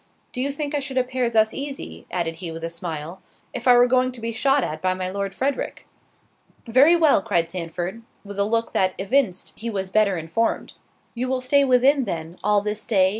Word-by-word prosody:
Do 250 - -3
you 280 +2 0
think 290 +1 -4
I 290 - +1
should 270 -1 -5
appear 255 -1 0
thus 220 -1 +3
easy," 275 0 -7
added 165 -2 -2
he 170 -1 -5
with 165 0 -7
a 165 - -3
smile, 170 +1 -6 0.3
"if 250 +1 -4
I 250 - +8
were 245 - +7
going 255 +1 +2
to 245 - -8
be 230 0 -3
shot 270 +4 +2
at 155 +1 -4
by 185 0 +1
my 185 0 -3
Lord 200 0 -3
Frederick?" 275 +3 -2 0.8
"Very 265 +8 +5
well!" 315 -10 +4
cried 170 -3 0
Sandford, 180 +4 -4 0.2
with 200 0 -7
a - - +4
look 230 +2 -1
that 185 -1 +1
evinced 200 -1 0
he 235 - -5
was 190 -3 -3
better 205 -3 +3
informed. 165 +8 -1 0.4
"You 245 +2 -3
will 260 0 0
stay 280 +3 +3
within 265 +1 +4
then, 165 -1 -5
all 210 0 +3
this 210 +1 -3
day?" 190 -4 +4
220 Hz, 210 wpm, -23 LUFS, 185-255 Hz, 0.8 s, I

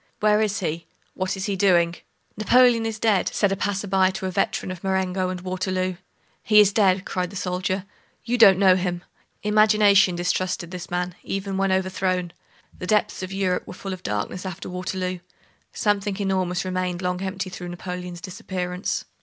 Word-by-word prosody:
Where 210 0 +3
is 210 -1 0
he? 165 -1 -3 0.3
What 185 +1 -2
is 190 - -3
he 200 - -1
doing? 175 -3 +3 0.4
"Napoleon 230 +1 +4
is 220 -1 -4
dead," 215 -4 +2
said 205 -2 +1
a - - +1
passer 205 0 -2
by 190 -1 +3
to 190 0 -5
a 185 - -1
veteran 190 0 -1
of 180 -2 -8
Marengo 190 -1 0
and 185 -1 -5
Waterloo. 185 0 -2 0.4
"He 210 0 +6
dead!" 195 -2 +2
cried 180 -2 -2
the 200 - -11
soldier; 185 +1 -2 0.4
"you 240 - 0
don't 195 -5 +8
know 190 -1 +6
him." 180 -1 -2 0.4
Imagination 210 -3 +5
distrusted 180 0 -1
this 180 -2 -7
man, 180 0 -2
even 195 0 -3
when 195 0 +1
overthrown. 185 -2 0 0.5
The 180 - -5
depths 210 0 +1
of 185 0 -5
Europe 190 -2 -1
were - - -8
full 195 +1 -5
of 185 - -8
darkness 105 - -3
after 185 -3 -6
Waterloo. 185 0 -3 0.5
Something 205 -2 0
enormous 185 -2 -1
remained 185 -1 -2
long 180 0 -1
empty 190 0 -4
through 180 -1 -7
Napoleon's 180 0 -6
disappearance. 180 0 -4
185 Hz, 170 wpm, -24 LUFS, 180-195 Hz, 0.5 s, don't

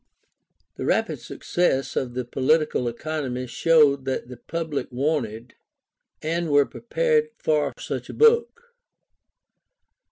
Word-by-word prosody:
The - - -4
rapid - - 0
success 135 -7 -1
of 125 -2 -2
the 125 -1 -2
Political 135 +1 +1
Economy 130 0 -3
showed 140 +1 +3
that 130 -2 -3
the 125 - -9
public 160 +3 -4
wanted, 125 -4 -2 0.7
and 165 +1 -1
were 145 -1 +5
prepared 465 - 0
for 150 -1 +1
such - - -5
a - - -6
book. 470 +1 +3
150 Hz, 115 wpm, -24 LUFS, 125-170 Hz, 0.7 s, were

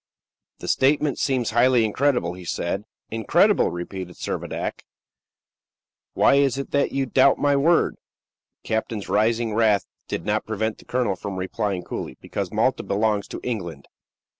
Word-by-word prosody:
"The - - -8
statement 145 +1 +2
seems 130 -5 0
highly 120 0 +4
incredible," 120 -5 +1
he 90 0 -10
said. 90 +4 -3 0.3
"Incredible?" 110 -1 +3
repeated 90 +1 -6
Servadac. - - -4 1.3
"Why 140 - +5
is 140 -2 +2
it 140 - -5
that 140 0 +1
you 135 -1 0
doubt 130 +2 +4
my 145 -1 +2
word?" 165 +5 +3 0.7
The - - -15
captain's 110 -2 -2
rising 115 +1 +1
wrath 110 -3 +3 0.2
did 85 - -4
not 105 +1 0
prevent 110 0 -2
the - - -16
colonel 120 -6 0
from 100 +1 -6
replying 95 0 -2
coolly, 65 - -6
"Because - - -4
Malta - - +1
belongs 105 0 0
to - - -6
England." 85 - -4
110 Hz, 145 wpm, -23 LUFS, 100-130 Hz, 1.3 s, Why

